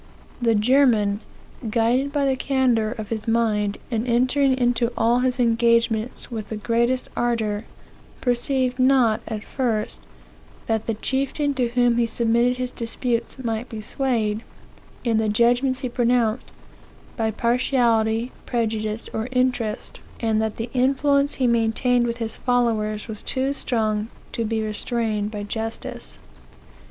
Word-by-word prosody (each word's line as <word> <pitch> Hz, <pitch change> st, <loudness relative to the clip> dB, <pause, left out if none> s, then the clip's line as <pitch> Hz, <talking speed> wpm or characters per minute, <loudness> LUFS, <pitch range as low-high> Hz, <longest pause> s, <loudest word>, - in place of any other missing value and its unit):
The 230 Hz, -2 st, +3 dB
German, 215 Hz, -3 st, +3 dB, 0.5 s
guided 240 Hz, +5 st, +1 dB
by 285 Hz, -1 st, +1 dB
the 265 Hz, -1 st, +2 dB
candor 255 Hz, -5 st, +1 dB
of 220 Hz, -4 st, -7 dB
his 225 Hz, 0 st, -4 dB
mind, 215 Hz, -3 st, +1 dB
and 230 Hz, +1 st, -1 dB
entering 260 Hz, +3 st, +3 dB
into 245 Hz, -1 st, +1 dB
all 235 Hz, +2 st, +3 dB
his 250 Hz, 0 st, 0 dB
engagements 230 Hz, 0 st, +2 dB
with 220 Hz, -3 st, -5 dB
the 220 Hz, -, -3 dB
greatest 235 Hz, +4 st, 0 dB
ardor, 225 Hz, -3 st, -1 dB, 0.5 s
perceived 250 Hz, +1 st, 0 dB
not, 255 Hz, -4 st, +4 dB
at 215 Hz, -2 st, -4 dB
first, 230 Hz, -6 st, -2 dB, 0.6 s
that 220 Hz, -1 st, -1 dB
the 225 Hz, -, 0 dB
chieftain 275 Hz, +5 st, -1 dB
to 255 Hz, -3 st, +1 dB
whom 240 Hz, 0 st, +2 dB
he 235 Hz, -, +2 dB
submitted 235 Hz, +2 st, +1 dB
his 250 Hz, -1 st, -3 dB
disputes 235 Hz, +1 st, -3 dB
might 230 Hz, -2 st, -3 dB
be 225 Hz, -, -6 dB
swayed, 220 Hz, -2 st, -1 dB, 0.6 s
in 230 Hz, -3 st, +2 dB
the 220 Hz, -1 st, +1 dB
judgments 245 Hz, +4 st, +2 dB
he 255 Hz, -, -1 dB
pronounced, 240 Hz, -1 st, +1 dB, 0.7 s
by 225 Hz, -3 st, 0 dB
partiality, 235 Hz, 0 st, +1 dB, 0.2 s
prejudice, 220 Hz, -2 st, -2 dB
or 220 Hz, +2 st, -2 dB
interest; 250 Hz, -4 st, -1 dB, 0.2 s
and 220 Hz, -2 st, +1 dB
that 220 Hz, -1 st, -2 dB
the 230 Hz, +1 st, -4 dB
influence 280 Hz, +2 st, +2 dB
he 260 Hz, -, 0 dB
maintained 240 Hz, +1 st, +2 dB
with 235 Hz, 0 st, -2 dB
his 225 Hz, -2 st, -4 dB
followers 225 Hz, -4 st, 0 dB
was 215 Hz, -2 st, -5 dB
too 265 Hz, +1 st, -1 dB
strong 215 Hz, -5 st, -1 dB, 0.2 s
to 230 Hz, -, -2 dB
be 220 Hz, 0 st, -1 dB
restrained 215 Hz, -1 st, -1 dB
by 210 Hz, -1 st, -5 dB
justice. 225 Hz, +2 st, -5 dB
235 Hz, 140 wpm, -23 LUFS, 220-250 Hz, 0.7 s, not